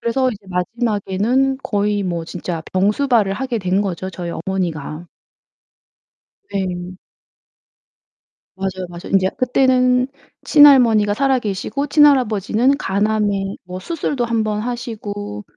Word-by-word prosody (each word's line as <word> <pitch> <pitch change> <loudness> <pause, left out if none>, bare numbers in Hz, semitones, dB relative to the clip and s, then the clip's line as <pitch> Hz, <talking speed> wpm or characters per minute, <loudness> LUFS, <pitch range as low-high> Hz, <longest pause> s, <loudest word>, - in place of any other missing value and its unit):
그래서 255 +2 +1
이제 205 -4 -10
마지막에는 225 +6 0
거의 205 -1 0
뭐 170 -2 -3
진짜 170 -1 -5
병수발을 210 +2 +2
하게 250 +1 -2
된 185 0 0
거죠, 185 -1 -4
저희 175 -1 -6
어머니가. 170 -3 -4 1.4
네. 180 -2 -4 1.6
맞아요, 190 -1 -4
맞아요. 175 +1 -9
인제 190 -1 +3
그때는 255 0 +3 0.4
친할머니가 245 -9 +6
살아 265 +3 +2
계시고 225 +7 -3
친할아버지는 255 -4 +3
간암에 205 -3 0
뭐 185 0 -7
수술도 285 - -2
1 235 -1 -1
번 210 -1 -2
하시고 210 - -5
205 Hz, 265 characters per minute, -19 LUFS, 185-250 Hz, 1.6 s, 친할머니가